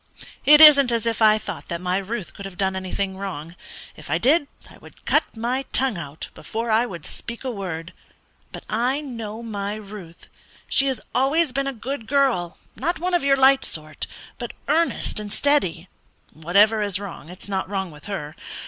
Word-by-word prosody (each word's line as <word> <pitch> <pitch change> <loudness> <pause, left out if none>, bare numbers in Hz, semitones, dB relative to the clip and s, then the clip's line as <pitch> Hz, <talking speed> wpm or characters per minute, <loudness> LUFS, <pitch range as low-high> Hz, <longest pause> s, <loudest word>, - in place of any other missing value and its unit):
It 300 +1 +8
isn't 280 -5 +9
as 230 -1 0
if 230 -1 -1
I 215 -1 +6
thought - - -7
that 170 -2 -3
my 180 +1 0
Ruth 200 0 -5
could 200 - -9
have 195 -2 -9
done 190 0 0
anything 190 +1 -3
wrong. 170 -4 -6 0.4
If 155 - -12
I 160 - +2
did, 285 - +3 0.2
I - - -16
would - - -17
cut - - +1
my 245 +4 -1
tongue 260 -3 +4
out 145 -1 -7
before 230 +1 -4
I 225 +3 +3
would 170 -8 -8
speak 235 +2 -6
a 260 - -2
word. 180 -6 -5 0.6
But - - -8
I 250 +6 0
know 230 -5 -6
my 205 -2 -4
Ruth. 200 -5 -10 0.4
She 275 - +3
has 260 -4 -1
always 280 +4 +2
been 275 +2 -1
a - - 0
good 250 -1 -6
girl: 260 -12 +1 0.2
not 340 +6 -1
one 360 +3 -2
of 350 - +2
your 275 0 +4
light 265 0 +5
sort, 155 -1 -5 0.3
but - - -5
earnest 330 -8 +1
and 210 -1 -6
steady. 190 - +1 0.5
Whatever 200 +8 +3
is 200 -2 0
wrong, 195 -5 -8
it's 180 +3 -9
not 190 -2 -2
wrong 190 -3 -3
with 150 0 -14
her. 160 -7 -5
215 Hz, 190 wpm, -23 LUFS, 185-265 Hz, 0.6 s, isn't